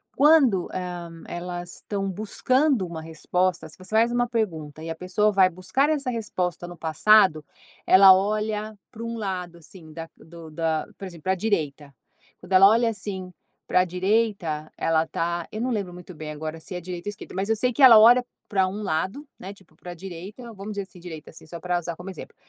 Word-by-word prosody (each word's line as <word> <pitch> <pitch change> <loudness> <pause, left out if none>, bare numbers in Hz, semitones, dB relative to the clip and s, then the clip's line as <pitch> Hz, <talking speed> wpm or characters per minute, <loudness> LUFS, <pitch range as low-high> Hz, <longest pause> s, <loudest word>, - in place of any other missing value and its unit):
quando, 275 - +5
hum, 175 -2 -6
elas 175 0 -6
estão 195 -1 -4
buscando 250 - +1
uma 165 -2 -7
resposta, 170 +1 -1
se 155 - -12
você 185 - -11
faz 230 +2 +4
uma 245 0 +1
pergunta 160 -10 -3
e 165 - -6
a 165 - -3
pessoa 190 +5 +1
vai 190 -2 +5
buscar 185 - 0
essa 285 -4 -1
resposta 180 -7 -3
no 175 -1 -10
passado, 160 0 +4 0.4
ela 190 0 +8
olha 210 +2 -1
para 230 -1 -9
um 230 0 -4
lado, 180 -4 -4
assim, 160 -1 -14
da 165 +1 -7
do 165 -1 -13
da, 160 -1 -1
por 195 - -7
exemplo, 170 -4 -11
para 190 - +1
a - - -1
direita. 155 -9 -2 0.5
Quando 180 +1 -15
ela 190 +1 +8
olha, 230 +1 +3
assim, 190 -4 -6 0.3
para 180 - +4
a - - +1
direita, 180 -4 -1
ela 165 0 +1
tá, 170 0 -2
eu 215 - -5
não 250 +1 -1
lembro 195 -5 -3
muito 180 0 -11
bem 155 -1 -7
agora 155 +1 -6
se 180 - -7
é 180 - -4
direita 180 +2 -6
ou - - -3
esquerda, 205 - -11
mas 195 +3 -2
eu 225 - +3
sei 250 +2 0
que 285 - -3
ela 235 -5 +10
olha 245 +3 +7 0.2
para 190 -3 +2
um 205 +3 -5
lado, 190 - -2
né, 195 +2 -8
tipo 190 -6 -23
para 175 +2 -10
a - - -6
direita, 195 +7 -9
vamos 205 +1 -7
dizer 200 -1 -3
assim 180 -1 -14
direita 160 -3 -9
assim, 160 - -15
só 170 +1 -8
pra 180 0 -1
usar 170 -1 -5
como 180 +2 -8
exemplo. - - -11
185 Hz, 210 wpm, -24 LUFS, 170-215 Hz, 0.5 s, ela